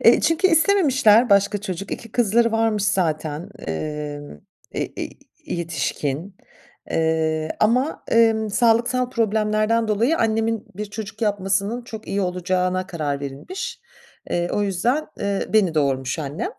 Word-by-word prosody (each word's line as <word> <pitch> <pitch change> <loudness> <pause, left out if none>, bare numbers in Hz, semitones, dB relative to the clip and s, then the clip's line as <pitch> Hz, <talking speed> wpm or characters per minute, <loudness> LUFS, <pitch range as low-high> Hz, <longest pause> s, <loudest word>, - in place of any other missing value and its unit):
E, - - +6
çünkü 330 +3 +3
istememişler 285 - +4
başka 200 +1 +4
çocuk. 190 -1 -5
2 230 -2 -7
kızları 230 0 +3
varmış 225 -2 +1
zaten, 165 -3 -1 0.2
emm, 145 - -4 0.4
e - - -1
e - - -5
e - - -7 0.4
yetişkin, 165 +1 -3 0.5
eee, 160 -1 0
ama, 250 +8 +2
emm, 225 -2 +3
sağlıksal 240 +3 +2
problemlerden 220 -1 +1
dolayı 230 +9 +2
annemin 225 -1 0
bir 210 +2 -4
çocuk 215 +2 -7
yapmasının 200 +3 0
çok 220 -2 -9
iyi 200 - 0
olacağına 185 0 0
karar 150 -6 -3
verilmiş. 140 - -6 0.5
Eee, 175 0 0
o 205 - +1
yüzden, 230 - 0
eee, 200 -1 -1
beni 200 -7 +3
doğurmuş 135 -2 0
annem. 150 - -3
205 Hz, 130 wpm, -22 LUFS, 170-230 Hz, 0.5 s, E